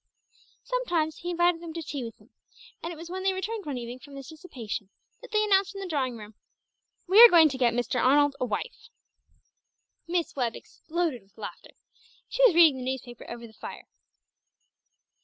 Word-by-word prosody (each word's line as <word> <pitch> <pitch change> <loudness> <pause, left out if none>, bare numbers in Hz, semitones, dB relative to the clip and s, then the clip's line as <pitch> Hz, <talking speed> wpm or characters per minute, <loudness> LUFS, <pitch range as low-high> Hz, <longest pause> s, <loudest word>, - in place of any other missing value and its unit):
Sometimes 350 -12 -1
he 350 - -6
invited 345 -1 +2
them 335 -2 -7
to 330 - -4
tea 285 -3 -5
with 230 -1 -8
him, - - -24 0.5
and 335 - -4
it - - -7
was 335 +2 -10
when 375 +1 -4
they 385 0 +1
returned 400 +1 -4
one 280 -3 -3
evening 240 +1 -7
from 280 +1 -13
this 275 0 -9
dissipation 245 - -7 0.3
that - - -12
they 430 -1 +2
announced 390 -1 +2
in - - -6
the 390 - -5
drawing 265 -7 -1
room 210 0 -11 0.7
"We 395 +5 +7
are 475 - +12
going 330 -4 +7
to 265 - -5
get 240 -2 +3
Mr. 245 0 0
Arnold 285 +2 +4
a 255 - 0
wife!" 250 - -5 1.2
Miss 340 -1 -1
Webb 245 -4 -1
exploded 325 -7 -4
with 195 +2 -30
laughter. 220 - -9 0.5
She - - 0
was 365 - +1
reading 325 -5 +7
the 255 - -6
newspaper 245 -2 -8
over 235 0 -7
the 220 - -14
fire. - - -9
315 Hz, 190 wpm, -27 LUFS, 250-360 Hz, 1.2 s, are